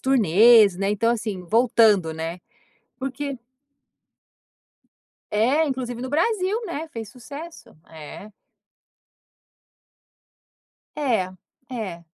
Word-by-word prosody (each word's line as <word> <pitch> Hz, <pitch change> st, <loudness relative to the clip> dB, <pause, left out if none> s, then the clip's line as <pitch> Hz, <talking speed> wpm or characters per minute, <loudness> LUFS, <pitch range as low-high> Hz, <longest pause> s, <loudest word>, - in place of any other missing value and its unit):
turnês, 220 Hz, -3 st, +5 dB
né, 195 Hz, +2 st, -1 dB
então, 230 Hz, +3 st, +1 dB
assim, 215 Hz, -5 st, -4 dB
voltando, 220 Hz, -5 st, +3 dB
né, 165 Hz, +2 st, -5 dB, 0.6 s
porque 270 Hz, +1 st, -4 dB, 1.9 s
É. 255 Hz, +10 st, +2 dB
Inclusive 250 Hz, -3 st, -4 dB
no 255 Hz, -, -4 dB
Brasil, 385 Hz, +6 st, 0 dB
né? 320 Hz, -2 st, -5 dB
Fez 225 Hz, -7 st, -7 dB
sucesso, 290 Hz, +7 st, -11 dB
é. 160 Hz, +6 st, -10 dB, 2.7 s
É, 225 Hz, -11 st, 0 dB, 0.4 s
é. 195 Hz, -9 st, -6 dB
230 Hz, 85 wpm, -23 LUFS, 195-270 Hz, 2.7 s, turnês